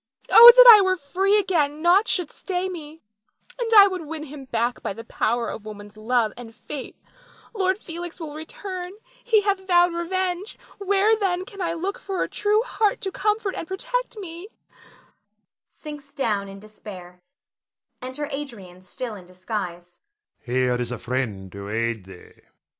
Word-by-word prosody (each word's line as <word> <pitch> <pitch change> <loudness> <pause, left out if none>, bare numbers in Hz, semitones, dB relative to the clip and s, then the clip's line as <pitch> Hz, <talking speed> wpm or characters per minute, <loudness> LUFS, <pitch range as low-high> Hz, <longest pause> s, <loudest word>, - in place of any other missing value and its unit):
Oh, 470 +1 +12
that - - +9
I 440 -3 +11
were 375 -1 +1
free 380 +7 +1
again, 310 -6 0
naught 370 +5 +4
should 355 -5 -1
stay 370 -1 -3
me; 320 -3 -9 0.6
and 475 -2 -2
I 400 - +11
would 370 -5 -3
win 315 0 -5
him 285 -2 -10
back 240 0 -2
by - - -3
the 225 - -9
power 235 0 -1
of 210 - -6
woman's 205 -1 -10
love 225 0 0
and 230 -2 -11
faith. 285 -3 -8 0.6
Lord 380 -3 0
Felix 345 -2 -8
will 310 -3 -7
return, 360 +4 -7 0.3
he 445 -3 +3
hath 390 -2 -1
vowed 350 -1 +4
revenge; 365 +3 -3 0.2
where 400 +2 +3
then 375 -4 -1
can 400 -1 -10
I 335 -2 -1
look 370 +4 -4
for 385 -2 -3
a - - -3
true 420 +2 +1
heart 435 -4 0
to 385 - -3
comfort 420 0 -1
and 330 - -6
protect - - -3
me 355 -1 -8 1.2
[sinks 295 -2 -11
down 210 -7 -1
in 195 0 -10
despair]. 195 -4 -11 0.8
[Enter 260 +4 -5
Adrian, 220 -11 -7
still 235 +5 -6
in 185 -4 -11
disguise.] 180 -2 -6 0.5
Adrian. 130 +1 +1
Here - - -3
is 120 0 -4
a 125 - -4
friend 115 -7 -4
to 100 +1 -8
aid 115 -2 -2
thee. 95 -2 -14
315 Hz, 165 wpm, -23 LUFS, -, 1.2 s, Oh